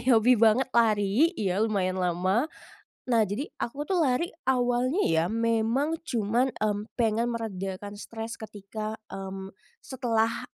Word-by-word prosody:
hobi 240 +1 +6
banget 230 +3 +4
lari 220 +4 +4
ya, 195 -1 0
lumayan 190 -4 0
lama. 185 - +1 0.6
Nah, 235 -3 +4
jadi 210 +9 -3
aku 285 +5 -4
tuh 365 -4 +2
lari 265 +5 +1 0.2
awalnya 255 +6 +1
ya 160 0 +3
memang 230 +6 +1
cuma, 240 - +1
mmm, 210 0 -2
pengen 230 +1 +2
meredakan 205 -3 -5
stres 225 +2 -6
ketika, 215 +1 -6
mmm, 190 0 -6 0.3
setelah 230 -4 -1
225 Hz, 125 wpm, -27 LUFS, 205-245 Hz, 0.6 s, hobi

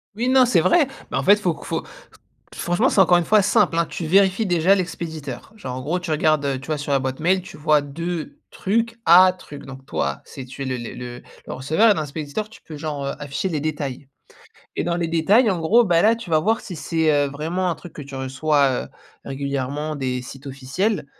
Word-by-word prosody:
Oui, 240 +3 -1
non, 260 -1 +6
c'est 195 -9 +3
vrai, 330 - +4 0.2
bah, - - 0
en - - -2
fait 205 - +7
faut 180 -5 0
q - - -12
faut - - -2 0.5
qu - - -19
franchement 175 +9 +1
c'est 205 - +3
encore 180 -1 +6
une 175 - +1
fois 215 +1 +4
simple, 185 -3 +2
hein. 170 - +2
Tu 165 - -5
vérifies 195 +4 +3
déjà 175 +2 +4
l'expéditeur, 170 -1 -5
genre 130 -12 -6
en 130 - -5
gros 170 +7 -1
tu 180 -2 -6
regardes, 155 -1 +2
heu, 135 -2 -1
tu 135 - -11
vois, 155 -2 -2
sur 145 0 -3
la 140 - +4
boîte 130 +1 -4
mail 185 +3 +2
tu - - -12
vois? 150 0 +3
De 165 +3 -5
trucs 230 +4 -1
à 185 +2 +8
truc. 145 -6 -12
Donc 135 0 -11
toi 70 0 -2
si 135 - -9
tu 130 +2 -8
es - - -3
le 130 -1 -2
le 120 +1 -7 0.3
le - - -6
receveur 160 - +3
et - - +5
dans 160 - -2
l'expéditeur 150 +7 -4
tu 225 - -15
peux 155 - -10
genre, 145 -2 -4
heu, - - -2
afficher 145 +6 -3
les 155 -5 -2
détails. 145 -3 -4 0.7
Et - - -1
dans 170 0 0
les 170 -2 -1
détails 200 +9 +3
en 185 - -1
gros, 220 +9 +4
bah, 170 -4 +3
là 225 +2 +5
tu 225 -7 -9
vas 155 - +4
voir 220 +8 +1
si 185 -8 -8
c'est, 160 0 0
heu, 145 -1 +2
vraiment 165 +6 -2
un 170 - -1
truc 175 - -12
que 150 - -8
tu 140 0 -10
reçois, 135 0 +1
heu, - - -13 0.4
régulièrement 140 +2 -3
des 130 -2 -2
sites 135 +2 -11
officiels, 140 +8 -2
160 Hz, 240 wpm, -22 LUFS, 140-185 Hz, 0.7 s, à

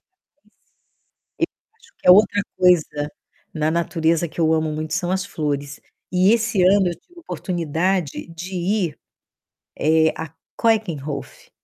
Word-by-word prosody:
Eu 375 - -60 1.6
acho 460 - -22
que - - -5
é - - +11
outra 205 +1 +5 0.2
coisa 155 -5 +2 0.4
na 155 0 0
natureza 165 0 +1
que 160 - -11
eu 160 0 +3
amo 155 -1 0
muito 155 +1 -4
são 175 0 -1
as 190 +1 -1
flores. 145 -5 -3 0.3
E 185 +3 +4
esse 225 -3 +1
ano 190 +1 +5
eu 170 - -4
tive 350 - -18
oportunidade 175 - -2
de 170 +3 -8
ir, 180 -2 -1 0.8
eh, 160 +1 +3
à 160 -2 -6 0.3
Keukenhof. 155 - -1
170 Hz, 135 wpm, -21 LUFS, 155-190 Hz, 1.6 s, é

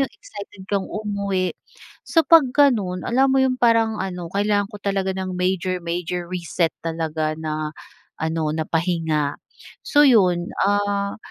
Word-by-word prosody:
'yong 270 - +1
excited 205 -2 -11
kang 200 -1 -2
umuwi. 200 -3 -2 0.6
So 330 -1 +3
pag 320 -6 +6
ganun, 210 -11 +2
alam 265 +3 +2
mo - - +3
'yong 260 -1 +1
parang 225 -3 +3
ano, 180 -2 -4
kailangan 205 0 +1
ko 205 - -9
talaga 195 -1 -1
ng 185 -1 -4
major, 185 0 0
major 175 +1 -3
reset 175 -2 -1
talaga 160 -1 -2
na 155 -1 -4 0.4
ano, 160 0 -1
na 160 - -1
pahinga. 160 -4 0 0.5
So 290 - +3
yun, 180 -9 +4 0.2
ah, 200 0 0
190 Hz, 145 wpm, -22 LUFS, 170-205 Hz, 0.6 s, pag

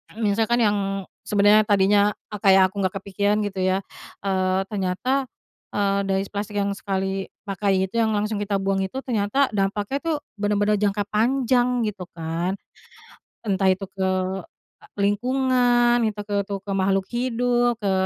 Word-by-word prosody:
Misalkan 225 +2 0
yang 210 -3 +3 0.5
sebenarnya 210 +1 +4
tadinya 205 0 +4 0.3
kayak 190 -2 +5
aku 200 0 -4
nggak 185 +1 -1
kepikiran 200 +2 0
gitu 195 -2 -3
ya, 185 0 +2 0.5
eee, 185 -1 +1
ternyata, 205 +7 -1 0.5
eee, 200 -1 +1
dari 195 0 0
plastik 205 +1 -5
yang 200 0 0
sekali 195 -1 -3 0.2
pakai 195 -1 +1
itu, 190 - -15
yang 220 -1 +2
langsung 210 0 -1
kita 205 -1 0
buang 195 0 0
itu, 190 +7 -5
ternyata 235 +3 +1
dampaknya 205 +5 0
tuh, 330 -2 0 0.2
benar-benar 205 0 +1
jangka 205 0 +1
panjang, 245 +2 +2
gitu 200 -3 -5
kan. 165 +3 -3 0.9
Entah 195 -2 +2
itu 190 +1 -2
ke 190 0 -2 0.9
lingkungan, 245 +2 +2
itu 210 -1 -4
ke 205 0 -4
itu 200 0 -5 0.2
makhluk 195 0 +1
hidup, 245 0 +1
ke 200 -2 0
205 Hz, 140 wpm, -23 LUFS, 195-225 Hz, 0.9 s, kayak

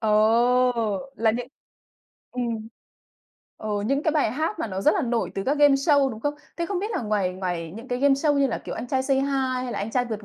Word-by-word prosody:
Ồ! 230 +2 +2
Là 225 0 +3
những 240 +2 -3 0.9
ừm. 230 -3 -3 0.9
Ờ, 215 - -7 0.2
những 275 +4 +1
cái 315 - +2
bài 300 -8 +2
hát 315 - -2
mà - - -2
nó 190 -3 -4
rất 300 - +4
là 385 - 0
nổi 240 -3 -1
từ 195 - -2
các 285 +2 0
gameshow, 285 -1 +4
đúng 220 -1 -8
không? 290 +3 -1 0.2
Thế 340 - -2
không 390 -1 -2
biết 415 +4 -3
là 435 - -2
ngoài 205 -4 0
ngoài 175 -3 -4
những 235 +4 -10
cái 245 0 -2
gameshow 285 +2 +3
như 280 - +4
là, - - -2
kiểu, - - -7
Anh - - -5
Trai 260 +1 0
Say 270 0 +1
Hi 270 - +2 0.3
hay 250 -1 -3
là - - -3
Anh 205 +3 -3
Trai 245 +2 +1
Vượt 220 -3 -5
245 Hz, 235 wpm, -25 LUFS, 220-275 Hz, 0.9 s, rất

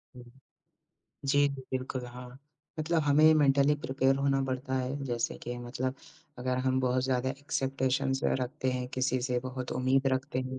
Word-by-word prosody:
हुँ। 125 - -10 1.0
जी, 145 +1 +4
जी, 135 -1 -6
बिल्कुल 130 -1 -3
हाँ, 125 +1 -10 0.4
मतलब 160 +1 +1
हमें 150 +2 +6
मेंटली 140 0 +4
प्रिपेयर 135 0 +2
होना 135 0 +1
पड़ता 130 0 -3
है। 130 +2 -3
जैसे 120 -2 -2
कि 120 0 -4
मतलब 130 +2 -3 0.4
अगर 125 +1 -1
हम 130 0 +2
बहुत 125 0 +1
ज़्यादा 130 0 0
एक्सपेकटेशन्स 135 -1 -1
रखते 130 +1 0
हैं 125 0 -2
किसी 130 0 +1
से 125 -1 0
बहुत 130 -1 -5
उम्मीद 130 +2 +2
रखते 130 0 -1
हैं 130 0 -4
130 Hz, 160 wpm, -30 LUFS, 125-135 Hz, 1.0 s, हमें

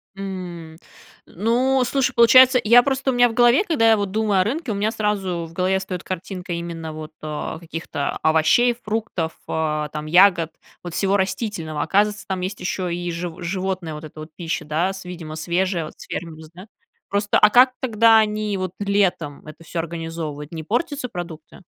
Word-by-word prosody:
М. 180 -4 -7 0.5
Ну, 250 +7 +1
слушай, 270 +1 0
получается, 250 +2 +7
я 235 +3 +7
просто, 265 -1 0
у - - -3
меня 245 0 +4
в - - -6
голове, 240 - +5
когда 230 -9 +3
я 220 - +5
вот 200 -2 -2
думаю 210 -3 +2
о - - +3
рынке, 270 - -3
у - - -2
меня 210 +2 0
сразу 195 -6 -2
в - - -16
голове 185 +2 +1
встает 185 -2 -6
картинка 185 0 -5
именно 165 -2 -5
вот, 155 0 -8
а, 155 +1 -5
каких-то 165 -3 -4
овощей, 160 +10 +4
фруктов, 210 -7 -2
э, 150 -2 -1
там 150 0 -5
ягод, 175 -1 +5 0.3
вот 175 -2 -7
всего 195 0 +1
растительного. 190 -6 -2
Оказывается, 210 +1 +1
там 190 -1 -3
есть 185 +1 -4
еще 180 -1 -2
и 175 0 -3
жив 170 0 -4
животная 185 -2 -3
вот 150 - -8
эта 155 0 -12
вот 155 +1 -8
пища, 165 -3 -4
да, 170 +6 0
с, 190 - -9
видимо, 165 -3 -7
свежая, 175 +1 -1
вот - - -12
с - - -10
фермы 165 -1 -5
вз 160 -1 -12
да? 185 +5 -12 0.4
Просто, 205 +1 +1
а 210 - +6
как 255 +3 +6
тогда 230 -2 +4
они 210 -1 0
вот 185 -1 -3
летом 190 -8 0
это 155 +2 -12
всё 165 +1 -5
организовывают? 165 -3 -5
Не 160 -1 -6
портятся 255 - -2
продукты? 170 -3 -8
185 Hz, 190 wpm, -22 LUFS, 165-215 Hz, 0.5 s, получается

